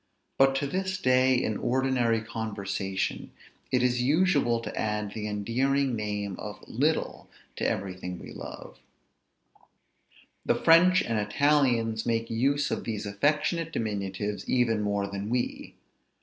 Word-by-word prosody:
But 135 Hz, 0 st, +5 dB
to 135 Hz, -, 0 dB
this 185 Hz, +5 st, -2 dB
day, 130 Hz, -4 st, +3 dB
in 110 Hz, -4 st, 0 dB
ordinary 125 Hz, -3 st, +1 dB
conversation, 100 Hz, -3 st, -3 dB, 0.4 s
it 125 Hz, -1 st, +2 dB
is 125 Hz, -1 st, +2 dB
usual 145 Hz, -4 st, +2 dB
to -, -, -6 dB
add 105 Hz, -1 st, -2 dB
the 105 Hz, -1 st, -4 dB
endearing 125 Hz, +6 st, 0 dB
name 105 Hz, -2 st, -3 dB
of 105 Hz, 0 st, -8 dB
little 150 Hz, +7 st, -1 dB, 0.3 s
to -, -, +1 dB
everything 90 Hz, -2 st, -4 dB
we -, -, -10 dB
love; -, -, -9 dB, 1.6 s
the -, -, +2 dB
French 180 Hz, +3 st, +5 dB
and 115 Hz, -2 st, -1 dB
Italians 115 Hz, -1 st, +2 dB
make 115 Hz, 0 st, 0 dB
use 140 Hz, +5 st, +1 dB
of -, -, -2 dB
these 110 Hz, -2 st, -4 dB
affectionate 150 Hz, -, 0 dB
diminutives 105 Hz, -3 st, -3 dB
even 115 Hz, -4 st, +2 dB
more 100 Hz, -1 st, 0 dB
than 100 Hz, +1 st, -5 dB
we. 120 Hz, +1 st, -2 dB
115 Hz, 130 wpm, -28 LUFS, 105-135 Hz, 1.6 s, But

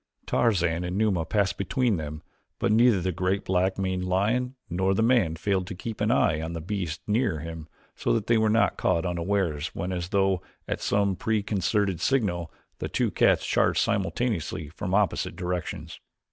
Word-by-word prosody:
Tarzan 90 Hz, -7 st, +1 dB
and 90 Hz, +2 st, -3 dB
Numa 100 Hz, -6 st, +1 dB
passed 100 Hz, +2 st, 0 dB
between 115 Hz, +1 st, +1 dB
them 75 Hz, -1 st, -6 dB, 0.3 s
but -, -, +1 dB
neither 115 Hz, -2 st, +5 dB
the 95 Hz, +2 st, 0 dB
great 95 Hz, +3 st, -1 dB
black 95 Hz, +1 st, +1 dB
maned 95 Hz, -1 st, -1 dB
lion 110 Hz, +8 st, 0 dB
nor 95 Hz, +3 st, +1 dB
the 110 Hz, -, +2 dB
man 115 Hz, -9 st, +3 dB
failed 95 Hz, +1 st, -1 dB
to 100 Hz, -, -6 dB
keep 110 Hz, +4 st, -6 dB
an -, -, +2 dB
eye 80 Hz, -, +3 dB
upon 80 Hz, +1 st, -4 dB
the 85 Hz, -, -4 dB
beast 90 Hz, -2 st, -3 dB
nearer 110 Hz, -4 st, +1 dB
him 80 Hz, -1 st, -7 dB, 0.3 s
so -, -, -1 dB
that 115 Hz, -3 st, 0 dB
they 115 Hz, -1 st, +3 dB
were 110 Hz, 0 st, +3 dB
not 115 Hz, +2 st, +2 dB
caught 85 Hz, -, +1 dB
unawares 85 Hz, -3 st, -1 dB
when, 90 Hz, +2 st, -3 dB
as 90 Hz, -1 st, -3 dB
though 95 Hz, -2 st, +2 dB, 0.3 s
at -, -, -3 dB
some 100 Hz, -1 st, +1 dB
preconcerted 100 Hz, -3 st, 0 dB
signal, 90 Hz, -, 0 dB, 0.3 s
the -, -, -3 dB
two -, -, 0 dB
cats -, -, +3 dB
charged -, -, +2 dB
simultaneously 100 Hz, -7 st, -1 dB
from 90 Hz, +4 st, -3 dB
opposite 105 Hz, -2 st, +1 dB
directions. 90 Hz, -1 st, -4 dB
95 Hz, 175 wpm, -26 LUFS, 85-105 Hz, 0.3 s, neither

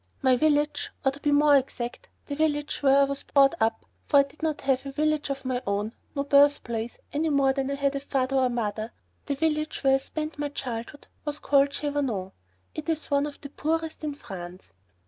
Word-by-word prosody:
My 260 Hz, -1 st, +5 dB
village, 295 Hz, +1 st, +1 dB, 0.2 s
or, 270 Hz, -, +4 dB
to 275 Hz, -, -11 dB
be 295 Hz, -, 0 dB
more 290 Hz, 0 st, +5 dB
exact, 260 Hz, -, -4 dB, 0.2 s
the 285 Hz, -, -5 dB
village 295 Hz, -1 st, 0 dB
where 275 Hz, 0 st, +5 dB
I -, -, +6 dB
was 275 Hz, 0 st, -2 dB
brought 275 Hz, 0 st, +4 dB
up, 225 Hz, 0 st, +1 dB, 0.2 s
for 285 Hz, -, +4 dB
I -, -, +6 dB
did 280 Hz, +2 st, -15 dB
not 315 Hz, -2 st, -1 dB
have 270 Hz, -1 st, +1 dB
a 275 Hz, -, -6 dB
village 305 Hz, +1 st, 0 dB
of 275 Hz, -1 st, -4 dB
my 255 Hz, -1 st, -1 dB
own, 205 Hz, +2 st, -1 dB, 0.2 s
no 280 Hz, -, 0 dB
birthplace, 280 Hz, -5 st, +3 dB, 0.2 s
any 310 Hz, +2 st, +1 dB
more 275 Hz, -2 st, +3 dB
than 270 Hz, 0 st, -2 dB
I 280 Hz, -, -1 dB
had 280 Hz, 0 st, 0 dB
a -, -, 0 dB
father 270 Hz, -1 st, 0 dB
or 260 Hz, -1 st, +3 dB
mother 220 Hz, -1 st, -3 dB, 0.3 s
the 285 Hz, -, 0 dB
village 305 Hz, +1 st, -1 dB
where 270 Hz, -1 st, +5 dB
I -, -, +6 dB
spent 305 Hz, +3 st, -4 dB
my 290 Hz, 0 st, -1 dB
childhood 255 Hz, 0 st, -6 dB, 0.2 s
was 295 Hz, -1 st, -3 dB
called 280 Hz, -1 st, +3 dB
Chavanon; 280 Hz, -10 st, -2 dB, 0.4 s
it 310 Hz, +1 st, -6 dB
is 315 Hz, -1 st, -2 dB
one 285 Hz, +1 st, +2 dB
of 290 Hz, -, -10 dB
the 280 Hz, -, -8 dB
poorest 320 Hz, +2 st, -2 dB
in 295 Hz, -2 st, -3 dB
France. 185 Hz, -7 st, -9 dB
280 Hz, 210 wpm, -27 LUFS, 260-295 Hz, 0.4 s, I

